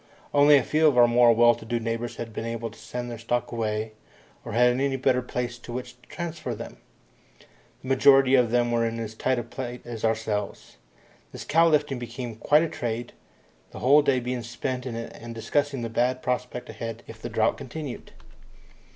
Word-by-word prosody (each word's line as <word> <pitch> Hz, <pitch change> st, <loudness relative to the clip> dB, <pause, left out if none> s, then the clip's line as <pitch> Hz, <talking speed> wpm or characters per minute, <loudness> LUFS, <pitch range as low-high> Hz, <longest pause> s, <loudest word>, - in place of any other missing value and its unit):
Only 145 Hz, 0 st, +7 dB
a -, -, +2 dB
few 155 Hz, +1 st, +3 dB
of 140 Hz, -5 st, +3 dB
our 120 Hz, -1 st, +7 dB
more 120 Hz, 0 st, +5 dB
well 120 Hz, +1 st, +6 dB
to -, -, -10 dB
do 120 Hz, +1 st, -2 dB
neighbours 115 Hz, +1 st, -3 dB
had 115 Hz, -1 st, -7 dB
been 110 Hz, -, -4 dB
able 115 Hz, -1 st, -4 dB
to -, -, -16 dB
send 120 Hz, 0 st, -6 dB
their 115 Hz, -, -7 dB
stock 120 Hz, +1 st, -2 dB
away, 110 Hz, -1 st, -2 dB, 0.5 s
or -, -, -7 dB
had 125 Hz, +2 st, +5 dB
any 135 Hz, +1 st, 0 dB
better 130 Hz, -1 st, +2 dB
place 125 Hz, -1 st, -4 dB
to 120 Hz, -, -10 dB
which 125 Hz, +1 st, -5 dB
to 125 Hz, -, -23 dB
transfer 170 Hz, -2 st, -5 dB
them. -, -, -9 dB, 1.1 s
The 130 Hz, -, -7 dB
majority 135 Hz, 0 st, +5 dB
of 125 Hz, -3 st, +5 dB
them 120 Hz, 0 st, +2 dB
were 115 Hz, 0 st, +2 dB
in 115 Hz, 0 st, -2 dB
as 110 Hz, -1 st, -5 dB
tight 130 Hz, +3 st, 0 dB
a 120 Hz, -, -2 dB
plight 120 Hz, +1 st, -7 dB
as 120 Hz, -2 st, -7 dB
ourselves. 110 Hz, -2 st, -2 dB, 0.5 s
This -, -, -8 dB
cow 165 Hz, +2 st, +4 dB
lifting 145 Hz, -4 st, +1 dB
became 120 Hz, -1 st, -6 dB
quite 150 Hz, +7 st, +4 dB
a -, -, 0 dB
trade, 120 Hz, -3 st, -4 dB, 0.6 s
the -, -, -11 dB
whole 140 Hz, +4 st, +5 dB
day 140 Hz, -3 st, +2 dB
being 125 Hz, 0 st, -3 dB
spent 125 Hz, +2 st, -4 dB
in 120 Hz, -, -4 dB
it 115 Hz, 0 st, -6 dB
and -, -, -13 dB
in 115 Hz, 0 st, -7 dB
discussing 135 Hz, +3 st, -1 dB
the -, -, -2 dB
bad 125 Hz, +3 st, 0 dB
prospect 125 Hz, 0 st, -3 dB
ahead 115 Hz, 0 st, -6 dB
if 115 Hz, 0 st, -12 dB
the -, -, -5 dB
drought 110 Hz, 0 st, +1 dB
continued. 140 Hz, 0 st, -7 dB
120 Hz, 205 wpm, -26 LUFS, 115-130 Hz, 1.1 s, Only